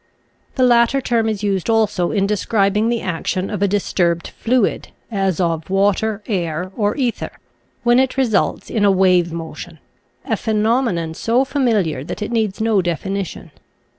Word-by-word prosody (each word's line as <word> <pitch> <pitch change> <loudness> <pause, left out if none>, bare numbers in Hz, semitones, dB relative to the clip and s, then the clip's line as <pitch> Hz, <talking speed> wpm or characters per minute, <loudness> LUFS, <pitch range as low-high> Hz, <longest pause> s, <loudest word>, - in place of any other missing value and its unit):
The 260 - +2
latter 240 +2 +4
term 230 -4 0
is 210 -1 -3
used 195 -1 -1
also 215 -6 +2
in 200 -2 +1
describing 210 +1 +1
the 235 -1 0
action 185 +2 -2
of 205 -2 -4
a 200 - +3
disturbed 175 -4 0
fluid 240 -2 0
— - - -39
as 195 -4 0
of 165 -2 -1
water, 205 +2 +1
air, 180 -3 -2
or 210 -2 0
ether 250 -4 -2 0.3
— - - -42
when 240 +1 +4
it 265 0 0
results 235 -7 0
in 215 - 0
a 200 - +5
wave 185 -3 +3
motion, 165 0 -7 0.5
a 220 - 0
phenomenon 215 -6 0
so 235 +9 +1
familiar 220 - 0
that 210 - -5
it 210 - -5
needs 220 -4 -1
no 220 -3 +2
definition. 180 0 -4
205 Hz, 165 wpm, -19 LUFS, 180-230 Hz, 0.5 s, a